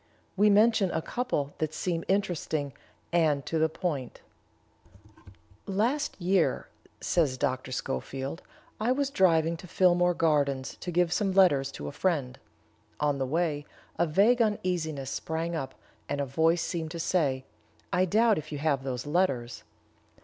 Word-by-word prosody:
We 205 +2 +4
mention 210 -1 +4
a 160 - -1
couple 240 - -2
that 155 0 -2
seem 170 -2 -2
interesting 170 -7 -1 0.4
and 155 -5 +2
to 165 - -1
the 160 0 +3
point: 150 -6 -4 1.5
"Last 230 +10 0
year," 180 -1 +1 0.3
says 150 -7 +1
Dr. 130 -2 -2
Schofield, 135 - -4 0.4
"I 225 +3 +1
was 280 0 -1
driving 165 - +3
to 180 - -11
Phillmore 175 0 +3
Gardens 140 -5 +1
to 180 - -6
give 175 0 +2
some 195 -1 0
letters 145 -8 +4
to 75 - -6
a - - -4
friend. 150 -9 -1 0.6
On 145 -2 +1
the 130 - -1
way, 155 0 0 0.4
a 170 - +3
vague 210 +10 +4
uneasiness 170 - -1
sprang 165 +1 -3
up, 135 -5 -4 0.3
and 145 - -2
a 140 - 0
voice 160 +5 +2
seemed 165 -3 -3
to 170 +1 -6
say, 140 -7 0 0.5
'I 180 +1 +3
doubt 220 +4 +3
if 155 +1 -10
you 150 - -3
have 140 -2 0
those 130 -1 -4
letters.' 145 -7 0
165 Hz, 150 wpm, -28 LUFS, 140-185 Hz, 1.5 s, We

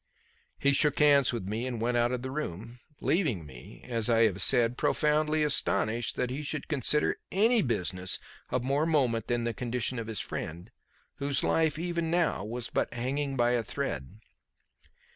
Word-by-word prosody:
He 140 - +3
shook 145 +1 +3
hands 145 -3 +5
with 115 -6 -4
me 110 +5 -2
and 120 -3 -4
went 120 +2 0
out 120 0 +2
of 125 -1 -3
the 130 - -4
room, 115 - -5 0.2
leaving 140 - 0
me, 65 -4 -12
as 115 -2 -1
I 115 -1 +4
have 100 -3 +2
said, 120 +3 +4
profoundly 150 +3 +1
astonished 120 -5 0
that 125 - -1
he 135 +4 -3
should 150 0 -4
consider 150 0 +1
any 225 +4 +4
business 95 - -1 0.3
of 125 -1 -1
more 140 +4 +1
moment 125 -8 +1
than 120 -1 0
the 115 0 -1
condition 125 +1 -2
of 115 - -5
his 110 -2 -2
friend, 85 +8 -5 0.5
whose 140 -1 -1
life, 160 -2 +2
even 170 0 -2
now, 170 - +1
was 120 +3 -4
but - - 0
hanging 135 +3 -2
by 120 0 +3
a 120 -1 +2
thread. 105 - -5
125 Hz, 175 wpm, -29 LUFS, 115-150 Hz, 0.5 s, hands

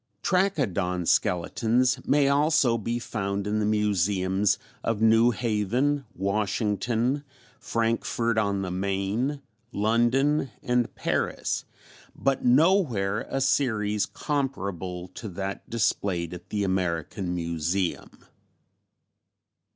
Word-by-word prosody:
Trachodon 100 - +1
skeletons 115 +10 +1
may 145 -1 +4
also 145 -3 +3
be 115 +3 -2
found 100 -4 -3
in 105 +1 0
the 105 - +1
Museums 100 -1 +1 0.3
of 115 -2 -1
New 115 +1 +5
Haven, 120 +5 0
Washington, 110 +6 0 0.4
Frankfurt 115 0 0
on 100 -2 0
the 90 - -3
Main, 100 +9 -1 0.3
London 120 +7 +2
and 125 -1 0
Paris, - - -1 0.5
but 135 -1 0
nowhere 125 - +3
a 135 - -1
series 110 -6 +1
comparable 95 - -3
to 105 +4 -8
that 95 +2 -5
displayed 100 -6 0
at 90 0 -10
the 105 -1 -1
American 90 -1 -1
Museum. 85 +2 -2
105 Hz, 95 wpm, -26 LUFS, 95-125 Hz, 0.5 s, New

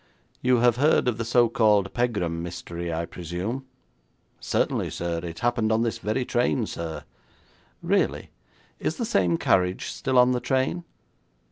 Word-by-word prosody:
'You 125 0 +3
have 120 -1 +4
heard 145 -1 +3
of 120 -2 0
the - - 0
so 120 +1 +4
called 105 -4 +2
Pegram 100 -9 -1
mystery, 85 0 -5
I 85 +1 -2
presume?' 90 +11 -5 0.7
'Certainly, - - 0
sir. 85 -1 -3
It 85 -1 -7
happened 120 -2 +1
on 110 +1 +2
this 115 - -2
very 110 +4 -1
train, 120 0 +1
sir.' 85 -5 -6 0.8
'Really? - - 0 0.5
Is 160 - -2
the 235 - -1
same 90 - +2
carriage 90 +1 +1
still 130 -1 -1
on 125 0 +6
the 125 - +1
train?' 135 +7 -1
110 Hz, 150 wpm, -25 LUFS, 85-125 Hz, 0.8 s, on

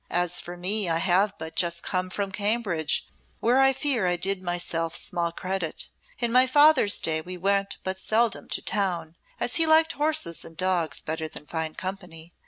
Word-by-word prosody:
As 175 0 +1
for 175 +1 -9
me, 190 +2 0
I 165 - +1
have 190 +4 +1
but 160 0 -8
just 170 -1 +1
come 185 -1 -2
from 200 +1 -3
Cambridge, 200 -6 0 0.3
where 245 +3 +2
I 270 0 +6
fear 260 -7 +1
I 175 - +2
did 190 +2 -1
myself 175 -2 -2
small 170 -1 -1
credit. 185 -1 -4 0.3
In 235 -1 -1
my 255 +2 +5
father's 290 -6 +5
day 160 -1 +1
we 180 +3 -7
went 195 +2 0
but 190 0 -3
seldom 225 +2 0
to - - -3
town, 180 -5 -1 0.2
as 245 - +1
he 325 -1 +4
liked 320 +1 +5
horses 300 - -1
and 165 - -12
dogs 180 -5 0
better 160 0 -4
than 150 - -9
fine 160 0 -4
company. 180 -3 -7
185 Hz, 185 wpm, -25 LUFS, 170-215 Hz, 0.3 s, I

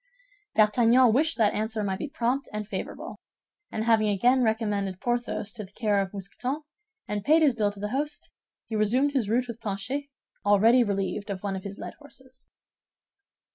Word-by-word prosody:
D'Artagnan 230 +2 +5
wished 315 +6 +2
that 215 -3 +3
answer 220 0 -2
might 190 -2 -2
be 300 - -4
prompt 270 -1 -1
and 210 -1 -4
favorable; - - -6 0.5
and 220 - -2
having 225 -2 +3
again 245 +6 +3
recommended 210 -4 0
Porthos 240 -3 -2
to 220 -3 -6
the 190 - -13
care 205 -2 +1
of 190 -1 -4
Mousqueton, 245 - -4 0.4
and 205 -1 -3
paid 315 +5 +5
his 285 -4 +5
bill 210 -3 +1
to 205 - -13
the 210 +1 -3
host, 290 +5 -3 0.4
he 225 - -4
resumed 245 +7 +2
his 255 -7 0
route 245 +3 +1
with 235 -1 -7
Planchet, 225 +8 -3 0.4
already 220 +5 +5
relieved 200 0 -2
of 195 -1 -4
one 200 -1 -2
of 190 - -5
his 200 0 -7
led - - -7
horses. 260 -3 -14
220 Hz, 175 wpm, -27 LUFS, 205-255 Hz, 0.5 s, D'Artagnan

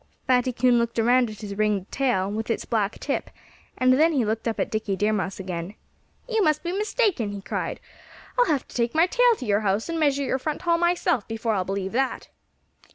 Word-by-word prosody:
Fatty 255 0 +2
Coon 245 0 +3
looked 235 0 -2
around 240 +1 +3
at 215 0 -10
his 205 -2 -5
ringed 210 -2 0
tail, 245 -9 +1
with 220 +2 -4
its 230 - -1
black 215 -2 -1
tip; 280 - -2 0.5
and 255 0 +4
then 320 +5 +4
he 260 -6 +1
looked 220 +2 -2
up 225 - -2
at - - -1
Dickie 215 -2 -1
Deer 210 +2 +1
Mouse 195 -2 -2
again. 180 +1 -5 0.5
"You 450 -3 +1
must 305 -2 +2
be 345 - -2
mistaken!" 405 - 0
he 200 - -6
cried. - - -3 0.6
"I'll - - +4
have 290 -5 0
to - - -14
take 235 +3 0
my 325 +2 +5
tail 485 +5 +4
to 255 - -6
your 205 -2 +2
house 205 - -1
and 330 -1 -2
measure 285 -2 +2
your 265 0 -1
front 305 +3 -4
hall 335 -1 +2
myself 345 - +1
before 225 0 -2
I'll 185 -3 0
believe 195 0 -3
that." 265 +3 -1
240 Hz, 220 wpm, -25 LUFS, 210-305 Hz, 0.6 s, my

